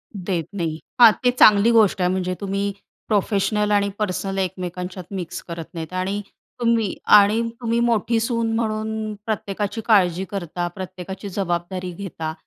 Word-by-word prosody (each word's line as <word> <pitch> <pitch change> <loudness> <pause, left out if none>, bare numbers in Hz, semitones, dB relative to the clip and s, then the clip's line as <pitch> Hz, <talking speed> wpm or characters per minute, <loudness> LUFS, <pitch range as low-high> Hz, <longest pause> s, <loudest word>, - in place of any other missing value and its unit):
देत 180 -4 -2
नाही. 165 -5 -3 0.2
हां, 230 -2 +11
ते 245 - +5
चांगली 215 -2 +6
गोष्ट 215 -5 +4
आहे. 180 - +3
म्हणजे 185 -1 -1
तुम्ही 200 0 -1 0.4
प्रोफेशनल 210 0 +1
आणि 200 -1 +3
पर्सनल 195 -1 -2
एकमेकांच्यात 180 0 -4
मिक्स 180 -2 -5
करत 165 -2 -6
नाहीत 165 0 -6
आणि 190 +3 -2 0.4
तुम्ही 230 -4 +1 0.2
आणि 210 +2 +4 0.2
तुम्ही 230 0 0
मोठी 235 -1 +2
सून 230 -1 0
म्हणून 220 -1 -2
प्रत्येकाची 210 0 -3
काळजी 185 -5 +3
करता, 175 -3 -3
प्रत्येकाची 190 +1 -7
जबाबदारी 180 -1 -3
घेता. 165 -4 -5
195 Hz, 140 wpm, -22 LUFS, 180-215 Hz, 0.4 s, हां